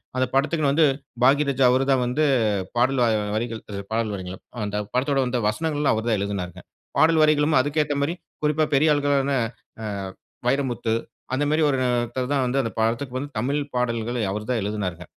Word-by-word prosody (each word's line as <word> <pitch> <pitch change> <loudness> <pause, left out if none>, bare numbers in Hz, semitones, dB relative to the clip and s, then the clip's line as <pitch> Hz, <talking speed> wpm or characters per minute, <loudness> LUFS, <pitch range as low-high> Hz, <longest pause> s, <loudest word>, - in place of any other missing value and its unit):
அந்த 130 0 +2
படத்துக்குனு 145 0 +2
வந்து, 160 0 +5 0.4
பாக்யராஜா 140 -1 +3
அவர் 130 +1 +3
தான் 130 -2 +3
வந்து 150 +5 0 0.5
பாடல் 125 +2 +2
வரிகள் 110 -3 +1
அ - - -2
வரிகள் 115 -1 -3 0.3
பாடல் 110 -1 0
வரிகள். 95 -1 -7 0.3
அந்த 105 0 -3 0.2
படத்தோட 135 +2 +1
வந்த 125 0 -1
வசனங்கள்லாம் 150 +4 0
அவர் 110 +2 -3
தான் 105 -3 +2
எழுதினாங்க. 95 -3 -3 0.4
பாடல் 160 +2 +5
வரிகளும் 150 -1 +3
அதுக்கேத்த 150 +1 0
மாரி, 145 +4 0 0.3
குறிப்பா 150 +1 +2
பெரிய 150 +3 +4
ஆள்களான 140 -1 +1 0.5
அ - - -4 0.6
வைரமுத்து, 125 -4 0 0.4
அந்த 140 - +1
மாரி 155 +1 +2
ஒருத்தர் 125 -1 0
தான் 135 - +2
வந்து 130 +2 0
அந்த 115 -3 -3
படத்துக்கு 120 +4 -1
வந்து 140 +2 -4
தமிழ் 140 +6 0 0.2
பாடல்களை 120 -1 -1
அவர் 105 +1 -4
தான் 120 - +1
எழுதுனாருங்க. 95 -4 -3
130 Hz, 165 wpm, -24 LUFS, 115-145 Hz, 0.6 s, வந்து